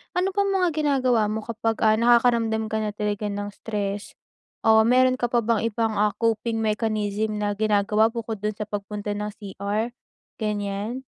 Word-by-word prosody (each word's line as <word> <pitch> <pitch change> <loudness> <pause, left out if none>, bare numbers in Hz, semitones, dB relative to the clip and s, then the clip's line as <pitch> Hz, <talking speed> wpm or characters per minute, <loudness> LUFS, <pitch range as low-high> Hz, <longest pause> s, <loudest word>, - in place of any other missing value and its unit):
ano 370 +2 +1
pang 400 +1 +1
mga 375 -3 +2
ginagawa 260 -7 +2
mo 215 +1 -3
kapag, 225 0 -2
ah, 215 0 +5
nakakaramdam 230 -2 +3
ka 220 - 0
na 210 -1 -3
talaga 210 0 -2
ng 205 0 -4
stress 205 -1 -4 0.5
o 220 0 +6
meron 255 +1 +4
ka 240 - +1
pa 240 -1 +1
bang 230 -1 +2
ibang, 225 0 0
ah, 210 -1 +2
coping 225 0 0
mechanism 215 -1 -1
na 210 0 -1
ginagawa 210 +1 +2
bukod 225 -2 -5
do'n 210 +1 -2
sa 210 - -4
pagpunta 205 0 -5
ng 210 0 -3
CR? 205 +3 -3 0.5
Ganiyan? 210 +3 -3
220 Hz, 165 wpm, -24 LUFS, 210-235 Hz, 0.5 s, o